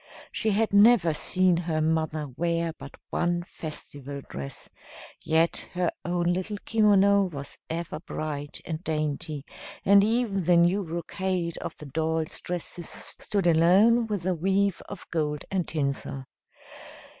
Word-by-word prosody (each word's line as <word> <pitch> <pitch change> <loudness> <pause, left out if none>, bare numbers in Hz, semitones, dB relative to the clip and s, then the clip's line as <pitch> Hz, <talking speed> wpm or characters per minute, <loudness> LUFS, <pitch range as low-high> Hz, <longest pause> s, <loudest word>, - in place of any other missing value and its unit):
She 220 - 0
had 215 +1 +1
never 205 -5 +6
seen 185 +3 +2
her 165 -2 -1
mother 155 -1 0
wear 170 +1 0
but 140 - -10 0.2
one 175 0 0
festival 145 -4 -7
dress, 70 0 -6 0.6
yet 165 +1 +2 0.2
her 180 -1 +1
own 175 0 +1
little 190 +3 -3
kimono 200 -2 +4
was 140 -6 -7
ever 165 -1 -4
bright 150 -3 -4
and 160 +1 -4
dainty, 150 -2 -2 0.4
and 200 0 +7
even 215 -4 +1
the 175 0 +5
new 175 +4 +3
brocade 170 +1 -3
of - - -6
the 150 - -9
dolls' 160 +2 0
dresses 175 -1 -4
stood 200 -3 -4
alone 190 +8 +5
with 205 -5 -2
the 185 +1 +1
weave 195 +3 +1
of 200 - -8
gold 150 -3 -1
and 185 -3 0
tinsel. 140 -2 -2
170 Hz, 135 wpm, -27 LUFS, 155-195 Hz, 0.6 s, and